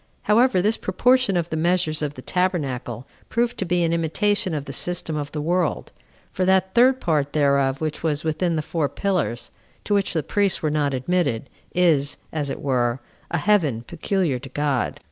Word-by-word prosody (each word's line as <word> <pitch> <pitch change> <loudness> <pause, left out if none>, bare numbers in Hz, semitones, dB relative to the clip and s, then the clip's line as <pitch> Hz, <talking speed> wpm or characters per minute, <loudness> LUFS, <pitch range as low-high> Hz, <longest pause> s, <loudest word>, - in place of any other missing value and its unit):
However, 210 -3 +3
this 215 +2 +2
proportion 255 -6 +2
of 170 -1 -2
the - - -1
measures 160 -1 +1
of 150 -1 -3
the 130 - -10
tabernacle 135 - -2 0.2
proved 240 0 0
to 190 - -1
be 175 0 +1
an 165 0 +1
imitation 170 +2 +1
of 145 -2 -4
the 140 - -7
system 170 +2 -1
of 145 -1 -4
the 150 -1 -4
world; 175 0 -1 0.4
for 185 - -1
that 190 0 +2
third 255 +2 +5
part 150 - 0
thereof 140 -2 +2
which 155 -1 -3
was 155 -2 -1
within 165 +2 0
the 155 - -1
four 155 -3 -1
pillars, 180 - -2 0.3
to 210 - -1
which 200 -1 +1
the 160 -3 0
priests 200 -4 +1
were 155 - +1
not 145 -2 0
admitted, 140 -4 -1 0.2
is, 155 -6 +3 0.2
as 150 -3 -1
it - - -5
were, 125 -2 +1 0.3
a 170 - 0
heaven 155 - +2
peculiar 170 -1 -1
to 135 - -10
God. 140 -2 -1
160 Hz, 185 wpm, -23 LUFS, 145-185 Hz, 0.4 s, third